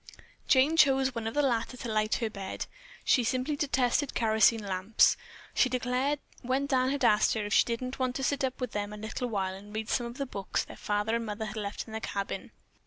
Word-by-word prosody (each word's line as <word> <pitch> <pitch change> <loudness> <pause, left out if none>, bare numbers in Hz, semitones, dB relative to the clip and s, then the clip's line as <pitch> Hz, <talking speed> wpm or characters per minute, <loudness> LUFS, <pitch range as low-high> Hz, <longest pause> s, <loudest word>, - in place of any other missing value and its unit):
Jane 285 +5 +4
chose 270 -3 +4
one 230 -1 -3
of 225 - -4
the 290 - +3
latter 250 -1 0
to 240 - -6
light 215 0 +2
her 230 - -1
to 220 - -3
bed. 195 -2 -5 0.4
She 250 - +4
simply 255 +5 0
detested 270 -1 +1
kerosene 220 0 +4
lamps, 195 +3 +3 0.4
she 260 - +3
declared 255 +3 0 0.2
when 260 +2 0
Dan 260 -2 +2
had 275 -2 0
asked 210 -1 +4
if 205 -2 -2
she - - +6
didn't 255 +3 -3
want 255 -1 0
to 270 - -2
sit 285 +1 0
up 260 -1 -1
with 250 -3 -3
them 205 0 -3
a - - -7
little 220 +3 -4
while 190 -4 -1
and 205 +2 -11
read 220 0 -3
some 240 -2 0
of 235 +2 -9
the 275 - -2
books 200 -7 -2
their - - -11
father 210 +2 0
and 230 - -4
mother 215 +1 -3
had 215 0 -6
left 205 -1 -4
in 220 - -11
the 220 - -3
cabin. 200 -2 -4
235 Hz, 230 wpm, -29 LUFS, 215-260 Hz, 0.4 s, she